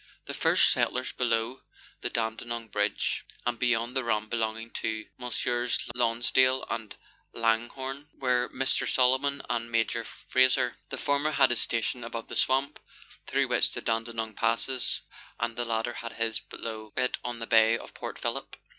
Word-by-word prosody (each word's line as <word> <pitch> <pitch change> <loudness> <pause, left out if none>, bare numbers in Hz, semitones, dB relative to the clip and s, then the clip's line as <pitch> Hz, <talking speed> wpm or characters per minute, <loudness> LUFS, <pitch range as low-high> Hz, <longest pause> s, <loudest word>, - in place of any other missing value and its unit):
The - - -5
first - - +4
settlers 130 +1 0
below 115 +1 0 0.4
the - - -1
Daudenoug 115 0 -3
bridge, 105 0 0 0.2
and 120 -1 -1
beyond 120 0 +1
the 130 - +2
run 110 -2 0
belonging 115 0 -2
to 110 -1 -2
Messrs. 120 0 0 0.2
Lonsdale 125 +2 +3
and 115 -3 -4 0.4
Langhorue, 125 +5 -1
were 125 -2 +1
Mr. 135 +1 +1
Solomon 130 +2 +3
and 115 -1 -2
Major 115 0 +1
Frazer. 130 0 +2
The - - -4
former 145 +1 +1
had 135 -4 +4
his 120 - +1
station 115 +1 -1
above 115 0 -5
the - - -5
swamp 135 +2 +2 0.5
through - - +1
which - - +3
the - - -4
Dandenong 115 -1 -2
passes, 115 +4 +1 0.4
and 115 -1 -1
the 120 0 -1
latter 115 +1 -1
had 115 -1 -6
his 115 -1 -1
below 110 -2 -7
it 130 -1 +1
on 120 -1 -3
the 115 - -5
bay 115 0 +5
of - - -11
Port - - -6
Phillip. - - -3
120 Hz, 155 wpm, -29 LUFS, 115-125 Hz, 0.5 s, bay